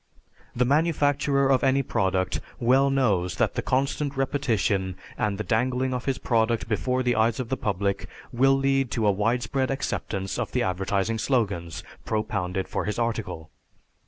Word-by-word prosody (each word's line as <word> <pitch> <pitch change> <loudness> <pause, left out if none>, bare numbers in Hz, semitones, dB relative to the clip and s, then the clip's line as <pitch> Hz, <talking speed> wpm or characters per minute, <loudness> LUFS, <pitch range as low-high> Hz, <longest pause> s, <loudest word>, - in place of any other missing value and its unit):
The 125 +1 +2
manufacturer 145 -2 +2
of 130 - +3
any 135 0 +3
product 95 -6 0 0.2
well 130 +3 +4
knows 105 -10 +1
that - - +1
constant 140 +1 0
repetition 115 -9 0 0.2
and 100 -2 -1
the 110 - -3
dangling 125 +5 0
of 125 0 -3
his 135 -2 0
product 115 -2 +1
before 125 +4 0
the 125 -1 +1
eyes 110 +2 +2
of 125 -3 -3
the 130 - 0
public 100 -1 -2 0.2
will 135 +3 +4
lead 135 -1 +1
to 115 -3 0
a 105 - +5
widespread 120 +5 0
acceptance 100 -7 -3
of - - -3
the - - +1
advertising 95 +4 -1
slogans 100 - -1 0.2
propounded 95 -4 -2
for - - -3
his 105 - -2
article. 115 -9 -3
115 Hz, 155 wpm, -25 LUFS, 100-135 Hz, 0.2 s, a